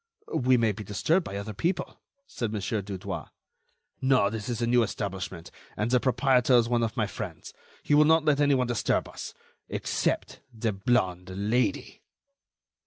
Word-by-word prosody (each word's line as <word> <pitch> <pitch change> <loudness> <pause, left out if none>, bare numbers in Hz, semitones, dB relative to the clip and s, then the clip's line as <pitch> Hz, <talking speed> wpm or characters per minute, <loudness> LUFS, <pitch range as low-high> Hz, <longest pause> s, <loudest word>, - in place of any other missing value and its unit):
"We 130 0 +3
may 115 -2 +2
be 105 +1 -7
disturbed 155 - +1
by 100 - -6
other 100 +2 -5
people," 175 - -2 0.2
said 115 - -4
Mon. 110 - -2
Dudouis. 100 -2 -4 0.7
"No. 130 -6 +3
This 110 +1 -5
is 120 - -2
a 120 - +1
new 120 +1 +4
establishment, 95 -6 -4 0.3
and 110 +3 -1
the 125 - +5
proprietor 130 0 +3
is 120 -1 +4
one 120 0 +1
of 110 -1 -2
my 110 - +2
friends. 100 - -7 0.3
He - - +1
will 150 +1 +7
not 160 0 +4
let 145 -1 +3
anyone 140 -3 +3
disturb 120 -2 0
us—except - - -4
the 110 -2 -2
blonde 95 -4 0
Lady." 105 +6 -1
115 Hz, 160 wpm, -27 LUFS, 100-130 Hz, 0.7 s, will